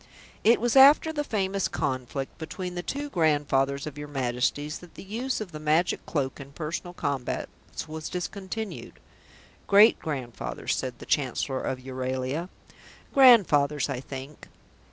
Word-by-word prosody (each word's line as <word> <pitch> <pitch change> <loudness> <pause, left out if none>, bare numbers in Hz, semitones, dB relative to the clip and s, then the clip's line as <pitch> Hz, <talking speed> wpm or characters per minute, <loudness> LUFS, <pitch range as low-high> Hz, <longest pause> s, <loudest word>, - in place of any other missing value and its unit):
"It 230 +2 +5
was 240 +2 0
after 285 +4 +7
the 295 -1 -1
famous 195 -6 -1
conflict 130 +1 -3
between 180 +3 -5
the 175 - -3
two 285 +10 -4
grandfathers 145 - +1
of 145 -1 -7
your 145 - -6
Majesties 135 +2 -1
that 175 -2 -15
the - - -9
use 235 +7 -2
of 210 -5 -6
the 155 - -7
Magic 155 +3 +1
Cloak 135 -4 -2
in 140 0 -10
personal 170 +3 -5
combats 140 +2 -4
was 155 0 -6
discontinued." 200 +4 -5 0.7
"Great 205 +3 +7
grandfathers," 120 - -3
said 125 -2 -4
the - - -11
Chancellor 135 -1 0
of 130 - -2
Euralia. 130 +5 -3 0.6
"Grandfathers, 155 - +5
I 130 - -3
think." 135 +2 -9
150 Hz, 140 wpm, -27 LUFS, 135-195 Hz, 0.7 s, after